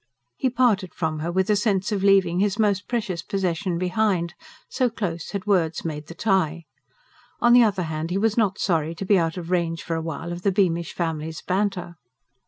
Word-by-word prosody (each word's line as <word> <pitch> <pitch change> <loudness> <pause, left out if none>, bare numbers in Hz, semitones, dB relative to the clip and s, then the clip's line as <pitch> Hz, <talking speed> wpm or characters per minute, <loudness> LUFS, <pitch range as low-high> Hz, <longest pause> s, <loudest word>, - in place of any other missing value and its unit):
He 260 - 0
parted 230 -8 +1
from 160 -2 -2
her 165 +3 -2
with 190 +1 +1
a - - +4
sense 200 -1 0
of 200 -2 -1
leaving 190 -3 +4
his 200 0 +1
most 205 -3 +1
precious 210 -8 -2
possession 185 -1 -1
behind, 180 -1 0 0.3
so 255 -2 +1
close 175 -8 -4
had 200 0 -4
words 175 -7 +1
made 150 -2 -4
the 170 - -9
tie. 170 -6 0 0.7
On 240 0 +5
the 245 - +8
other 200 -5 +2
hand, 160 0 -3
he 180 - -1
was 215 +1 +1
not 210 -4 +1
sorry 165 -3 0
to 195 - -5
be 195 -1 +4
out 165 +1 -1
of 175 0 -6
range 170 -2 0
for 170 - -3
a 165 - -2
while 165 +1 -5
of 175 0 -5
the 200 - +2
Beamish 170 -3 +1
family's 160 -2 -3
banter. 185 -3 -1
185 Hz, 200 wpm, -24 LUFS, 165-205 Hz, 0.7 s, the